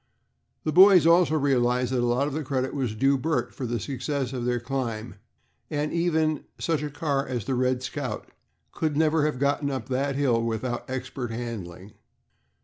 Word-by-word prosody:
The 155 - 0
boys 185 0 +8
also 165 -1 +5
realized 125 -3 +1
that 130 - +1
a 120 - +1
lot 125 +4 +1
of 150 +2 -3
credit 130 -1 -1
was 125 -6 -2
due 135 +4 +2
Bert 160 +4 -1
for 130 - -4
the 120 0 -2
success 135 +2 -3
of 125 -2 -3
their 125 0 +1
climb, 120 -3 -3 0.6
as 150 0 -1
even 160 -2 +1
such 160 -4 -1
a 150 - -3
car 145 -1 -1
as 120 -5 -3
the 135 - -1
"Red 130 0 +1
Scout" 130 +1 -4 0.4
could 155 -3 -1
never 155 -1 +3
have 150 - -2
gotten 140 +1 +1
up 135 -1 -4
that 135 +2 0
hill 130 -5 +2
without 115 +2 -3
expert 130 -1 -4
handling. 105 -5 -6
135 Hz, 175 wpm, -26 LUFS, 120-150 Hz, 0.6 s, boys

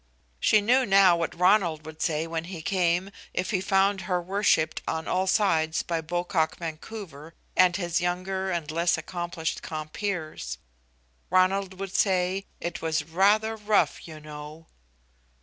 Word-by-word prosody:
She 215 - +4
knew 250 +5 +4
now 195 -5 +6
what 170 0 -3
Ronald 180 -4 +3
would 160 0 -10
say 160 -1 0
when 165 0 -4
he 170 -3 -7
came, 180 0 +1 0.2
if 180 - -1
he 190 -4 0
found 195 +1 +2
her 180 0 -1
worshiped 180 -3 +1
on 160 0 -2
all 185 +1 0
sides 165 -6 +2
by 165 -1 -2
Pocock 175 0 -1
Vancouver 165 -1 -8 0.2
and 180 -1 +5
his 175 -2 -1
younger 185 +2 -2
and 170 -4 -2
less 170 +2 +2
accomplished 175 0 -4
compeers. 155 +2 -4 0.7
Ronald 190 +1 +2
would 195 -1 -5
say 190 0 +1
"it 170 0 -4
was 160 -2 0
rather 205 +7 +2
rough, 210 -3 +1
you 155 -1 -9
know." 150 +1 -10
175 Hz, 145 wpm, -26 LUFS, 160-195 Hz, 0.7 s, now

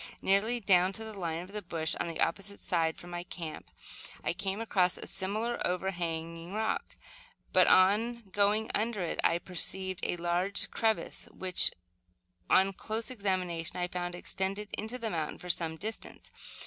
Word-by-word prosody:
Nearly 210 +5 +2
down 190 -3 +4
to 225 - -4
the 220 0 -7
line 170 -4 -2
of 185 - -12
the 210 0 -4
bush 165 -4 -1
on - - 0
the 165 - -4
opposite 200 +4 0
side 165 -2 +1
from 175 - -9
my 175 0 -3
camp, 170 -2 -7 0.5
I - - +1
came 195 +2 -2
across 185 -5 +2
a - - -6
similar 215 +5 -2
over 180 +2 0
hanging 165 0 -4
rock; 220 +1 -1 0.6
but - - +6
on 225 +6 +5
going 205 +2 +2
under 215 -3 0
it, 170 - -2
I 170 - +4
perceived 185 +1 0
a - - 0
large 175 +3 0
crevice, 220 -1 +1
which, 185 -1 +1 0.8
on 195 +1 +5
close 220 +5 -3
examination, 185 -7 -1
I 180 0 0
found 175 0 -3
extended 195 +3 -2
into 220 +4 -3
the 230 -3 -3
mountain 160 -3 -2
for 180 - -9
some 165 -2 0
distance. 220 +5 -5
190 Hz, 165 wpm, -31 LUFS, 175-210 Hz, 0.8 s, but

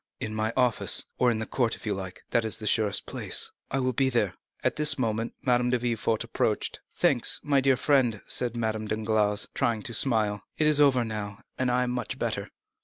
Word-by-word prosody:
"In 110 - -4
my 110 +1 -1
office, 125 -3 +2
or 125 - +4
in 115 - +1
the 110 - -3
court, 120 -1 0
if - - -13
you 105 - 0
like,—that 95 +4 -3
is 110 - 0
the 110 - -6
surest 105 -1 +2
place." - - -1 0.2
"I 135 - -1
will 130 -1 0
be 135 +2 +2
there." 110 -7 +1 0.3
At - - +1
this 150 -1 +2
moment 115 -2 -1
Madame 125 -2 +2
de 125 - +2
Villefort 115 -2 -1
approached. - - -1 0.2
"Thanks, - - +2
my 140 -2 +3
dear 135 -1 +3
friend," 125 -8 +2
said 120 -1 -2
Madame 110 -1 -2
Danglars, 110 -1 0
trying 110 -3 0
to 120 - -4
smile; 110 -4 +2 0.2
"it 155 - +2
is 150 -1 +5
over 130 -4 +4
now, 105 0 -6 0.2
and 130 -1 +1
I 125 +1 +2
am 125 - -2
much 125 0 -3
better." - - -2
115 Hz, 205 wpm, -27 LUFS, 110-125 Hz, 0.3 s, is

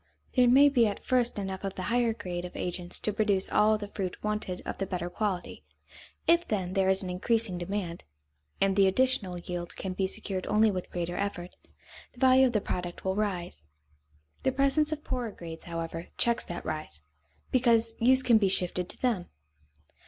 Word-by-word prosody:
There 250 -2 +5
may 270 +4 +7
be 250 -5 +4
at 205 - -4
first 245 -3 +1
enough 190 -1 -4
of 195 -1 -4
the 185 - -4
higher 240 -1 +3
grade 180 -5 -5
of 180 - -8
agents 175 0 -3
to 210 - -1
produce 205 -2 +2
all 215 +1 +4
the 205 -1 -7
fruit 190 -3 -4
wanted 210 -4 -3
of - - -5
the 195 - -2
better 175 -2 -4
quality. 195 -2 -3 0.6
If, 340 +1 +4
then, 185 -4 -2
there 190 -1 +2
is 190 0 +3
an 180 - -4
increasing 195 0 0
demand, 175 -1 -4 0.6
and 195 -1 +2
the 195 -1 +5
additional 195 -4 +1
yield 175 0 -6
can 190 -1 -4
be 190 0 0
secured 190 0 -2
only 215 +1 +4
with 185 -2 -5
greater 175 0 -3
effort, 185 -3 -4 0.6
the 245 - -17
value 260 0 +6
of 245 - -3
the 210 - +1
product 175 -1 -5
will 190 0 0
rise. 185 - -2 0.8
The 265 - +1
presence 275 +3 +2
of 305 -1 -4
poorer 250 -3 -3
grades, 165 -5 -9
however, 165 0 -5
checks 235 0 +2
that 175 - -6
rise, 155 - -5 0.5
because 230 -3 +3
use 260 +3 +5
can 235 -3 +5
be 200 -2 +2
shifted 180 -1 0
to - - -8
them. 225 -8 0
195 Hz, 190 wpm, -29 LUFS, 180-235 Hz, 0.8 s, may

